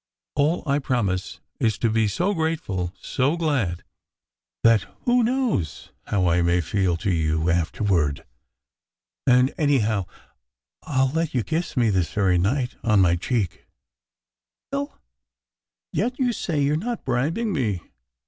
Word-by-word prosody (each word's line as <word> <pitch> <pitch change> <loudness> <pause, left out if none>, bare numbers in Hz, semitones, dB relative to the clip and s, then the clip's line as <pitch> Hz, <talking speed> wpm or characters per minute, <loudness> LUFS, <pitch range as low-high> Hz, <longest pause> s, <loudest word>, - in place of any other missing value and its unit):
All 150 +5 +1
I 140 -1 +2
promise 105 -9 -1 0.2
is 110 -3 +1
to 115 - +1
be 110 -1 +2
so 180 - 0
grateful, 155 - -2
so 140 +6 0
glad, 130 - 0 0.8
that 115 -3 +4
who 245 0 +3
knows 235 - -1 0.2
how 95 -3 +1
I 85 0 +3
may 85 +1 +3
feel 90 0 0
to 95 - -1
you 80 0 +1
after 85 +4 -1
ward? 80 -8 +1 1.0
And 125 +1 +5
anyhow, 110 - +2 0.7
I 135 -4 +1
ll 130 - +1
let 160 -3 -1
you 120 - +2
kiss 160 - -3
me, 115 -3 +3
this 90 -4 0
very 95 -4 +2
night 120 +7 0
on 105 -3 +3
my 90 -2 +4
cheek." 95 0 -2 1.0
"You 280 - 0
will? 285 +1 -6 1.0
Yet 245 +5 -1
you 250 -3 +1
say 165 -7 -2
you 140 - +2
re 150 - +2
not 235 +7 -4
bribing 155 - 0
me 110 - -1
120 Hz, 150 wpm, -24 LUFS, -, 1.0 s, And